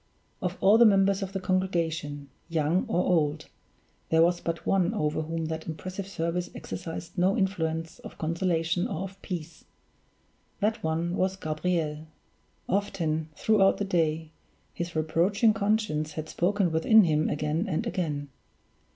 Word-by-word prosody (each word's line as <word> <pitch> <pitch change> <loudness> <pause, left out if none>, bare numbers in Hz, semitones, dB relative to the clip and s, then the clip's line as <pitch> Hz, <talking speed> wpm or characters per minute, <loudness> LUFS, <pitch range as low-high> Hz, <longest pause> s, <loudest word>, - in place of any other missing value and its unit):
Of 180 0 -2
all 210 +4 +6
the 235 - +8
members 195 -1 +4
of 195 -1 -3
the 195 - -3
congregation 165 -7 -1 0.2
young 165 +2 +1
or 180 - +1
old 155 -3 +1 0.6
there 160 0 +5
was 175 +1 +2
but 165 0 -3
one 185 -3 +2
over 150 +1 0
whom 165 +1 -3
that 160 0 -4
impressive 185 +5 -5
service 175 -1 -2
exercised 175 +1 -6
no 185 +2 +3
influence 165 -4 -1
of - - -11
consolation 165 +1 0
or - - -3
of 195 0 -9
peace; 170 -3 -6 1.0
that 215 +1 0
one 165 +2 -1
was 185 +1 +1
Gabriel. 155 -2 -2 0.6
Often, 160 -6 -1
throughout 195 +2 +3
the 205 - -1
day, 160 -4 0 0.4
his 170 -1 -5
reproaching 180 +8 +2
conscience 200 -8 0
had 155 0 -5
spoken 190 0 +1
within 210 +7 +6
him 155 -2 +2
again 150 +6 -1
and 160 - -1
again. 150 -5 -2
170 Hz, 140 wpm, -28 LUFS, 160-190 Hz, 1.0 s, the